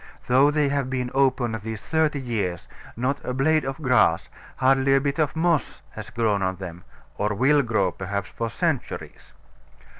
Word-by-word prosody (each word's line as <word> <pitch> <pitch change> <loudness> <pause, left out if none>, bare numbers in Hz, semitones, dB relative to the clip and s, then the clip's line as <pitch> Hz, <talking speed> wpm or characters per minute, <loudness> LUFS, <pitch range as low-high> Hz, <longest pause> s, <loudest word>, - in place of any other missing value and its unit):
Though 130 +4 +5
they 150 -1 +1
have 140 -2 -1
been 125 -1 -2
open 130 -3 +2
these 110 -1 -5
thirty 155 -2 +1
years, 105 -9 -3 0.3
not 130 +4 -1
a 125 - -3
blade 155 +4 +2
of 135 0 -4
grass, 125 -10 +3 0.3
hardly 135 +1 +3
a - - +5
bit 140 +2 -2
of 155 -1 +1
moss, 160 -5 0
has 110 0 -8
grown 115 -4 0
on 95 0 0
them, 90 -2 -8 0.4
or 105 0 0
will 140 +6 +4
grow, 110 -7 +1
perhaps, 100 +2 -4
for 115 0 -3
centuries. 155 +2 -3
130 Hz, 170 wpm, -24 LUFS, 110-140 Hz, 0.4 s, Though